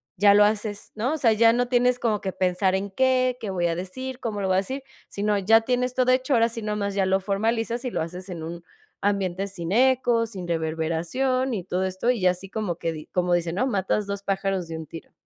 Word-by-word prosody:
ya 200 +2 +6
lo 205 0 +7
haces, 210 -1 -2
¿no? 235 +7 -1
O - - -3
sea, 235 -6 +3
ya 225 +1 +5
no 245 +1 +1
tienes 250 0 +2
como 215 -3 0
que 190 - -2
pensar 185 +1 +1
en 195 +1 -2
qué, 255 +3 +2
qué 215 - -4
voy 175 -2 0
a 165 - -1
decir, 255 +9 -6
cómo 220 -4 -3
lo 195 - -1
voy 190 - +2
a - - +3
decir, 260 +8 -4 0.3
sino 205 0 0
ya 220 +4 +5
tienes 250 +1 0
todo 255 0 +3
hecho, 260 +2 +1
ahora 230 -2 +4
sí 230 -1 -5
nomás 210 -2 -2
ya 195 -1 +2
lo 190 +1 +2
formalizas, 225 +4 -1
y 250 - -3
lo - - -2
haces 180 +4 -6
en 175 -3 -6
un 170 +1 -7 0.4
ambiente 195 -1 0
sin 180 -2 -4
eco, 245 -2 +3
sin 190 -5 -7
reverberación 165 +11 -1
y 190 -6 -3
todo 185 0 -1
esto, 190 +5 -1
y 235 -7 +1
así 180 +1 +1
como 205 -7 -3
que 165 -1 -2
di 155 -1 -8
como 180 -1 0
dicen, 170 -1 0
¿no? 255 +7 +1
Matas 200 -2 0
2, 200 0 -4
pájaros 195 -3 -1
de 165 - -4
un 160 -2 -8
tiro. 165 - -10
200 Hz, 240 wpm, -25 LUFS, 185-235 Hz, 0.4 s, lo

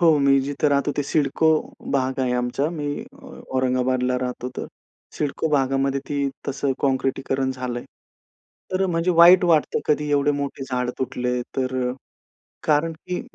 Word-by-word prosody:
हो, 165 -3 +5
मी 135 0 +5
जिथे 145 +2 0
राहतो 140 +1 +1
ते - - +3
सिडको 155 +1 +2 0.5
भाग 130 0 0
आहे 125 -1 +1
आमचा 125 +4 -1
मी 150 - -3 0.7
औरंगाबादला 130 0 +1
राहतो 125 0 -4
तर. - - -4 0.5
सिडको 150 +2 -1
भागामध्ये 135 0 +1
ती 145 - -1 0.3
तसे 140 0 0
काँक्रिटीकरण 135 0 0
झालंय. 125 -2 -4 0.9
तर 190 +1 +1
म्हणजे 170 0 +1
वाईट 180 +1 +8
वाटतं 160 -3 +3
कधी 150 0 +1
एवढे 145 0 +3
मोठे 140 -1 -4
झाड 125 -1 -2
तुटले 125 -1 -1 0.2
तर 130 0 -1 0.2
अ, - - -3 0.7
कारण 155 +2 +2
की 180 +5 -5
135 Hz, 145 wpm, -23 LUFS, 130-150 Hz, 0.9 s, वाईट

